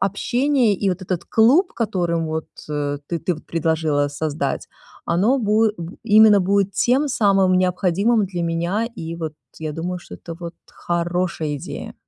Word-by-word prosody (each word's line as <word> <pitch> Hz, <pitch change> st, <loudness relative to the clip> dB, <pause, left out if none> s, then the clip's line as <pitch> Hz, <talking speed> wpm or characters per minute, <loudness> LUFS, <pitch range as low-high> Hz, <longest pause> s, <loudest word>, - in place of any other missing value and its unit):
общение 240 Hz, +3 st, +1 dB
и 195 Hz, +1 st, -1 dB
вот 185 Hz, +1 st, -4 dB
этот 180 Hz, -2 st, -3 dB
клуб, 265 Hz, -, +4 dB
которым, 175 Hz, -7 st, -1 dB
вот, 160 Hz, 0 st, -3 dB, 0.2 s
э, 145 Hz, -1 st, -2 dB
ты 170 Hz, -, -1 dB
ты 180 Hz, -, -1 dB
предложила 160 Hz, -3 st, 0 dB
создать, 150 Hz, +1 st, -3 dB, 0.4 s
оно 200 Hz, +11 st, +2 dB
бу 220 Hz, -1 st, +3 dB
э, 210 Hz, -, +1 dB
бу 170 Hz, +2 st, -8 dB
именно 215 Hz, -1 st, +6 dB
будет 195 Hz, +1 st, +1 dB
тем 260 Hz, +9 st, +2 dB
самым 195 Hz, -8 st, +3 dB
необходимым 190 Hz, +4 st, +2 dB
для 180 Hz, -2 st, -4 dB
меня, 170 Hz, +7 st, -1 dB
и 165 Hz, +1 st, -5 dB
вот 160 Hz, -2 st, -5 dB, 0.3 s
я 155 Hz, -1 st, -3 dB
думаю, 180 Hz, +3 st, -4 dB
что -, -, -11 dB
это 165 Hz, -, -9 dB
вот 170 Hz, -1 st, -6 dB
хорошая 170 Hz, -3 st, -2 dB
идея. -, -, -7 dB
180 Hz, 160 wpm, -21 LUFS, 165-210 Hz, 0.4 s, именно